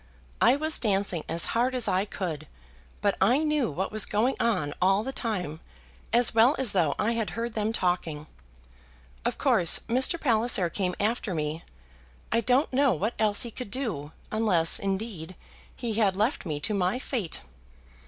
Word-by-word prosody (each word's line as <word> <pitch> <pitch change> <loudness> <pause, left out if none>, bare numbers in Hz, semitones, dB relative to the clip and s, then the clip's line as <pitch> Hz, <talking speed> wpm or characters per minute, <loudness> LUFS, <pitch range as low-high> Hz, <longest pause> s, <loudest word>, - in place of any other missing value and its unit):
I 255 - +5
was 310 +2 +1
dancing 195 -6 0
as 170 - +3
hard 250 +3 +1
as 245 -3 +1
I 190 0 +1
could, 165 -7 -5 0.5
but 200 -2 +1
I 245 +10 +3
knew 300 - +1
what 180 +6 -3
was 215 -1 0
going 230 +6 +1
on 185 -11 0
all 195 +3 +3
the 265 - -4
time 180 - -4 0.5
as 240 0 +4
well 230 +5 +5
as 260 -5 +2
though 165 -7 +1
I 220 - 0
had 230 -2 -2
heard 235 0 -3
them 215 0 -1
talking. 175 -7 -1 1.0
Of - - -1
course 170 -1 +3
Mr. 260 +8 +4
Palliser 225 - +2
came 180 -1 -2
after 215 -2 -1
me. 155 +1 -3 0.7
I 230 - +2
don't 255 +6 +1
know 275 -1 +3
what 205 +8 -2
else 210 -2 +3
he 235 - -6
could 250 -1 -7
do, 200 - -3 0.2
unless, 195 -7 +2
indeed, 195 -3 -4 0.4
he 235 -3 -3
had 205 -3 +1
left 215 - 0
me 150 -2 -2
to 210 - -1
my 190 +2 0
fate. 240 - -4
210 Hz, 170 wpm, -27 LUFS, 180-240 Hz, 1.0 s, I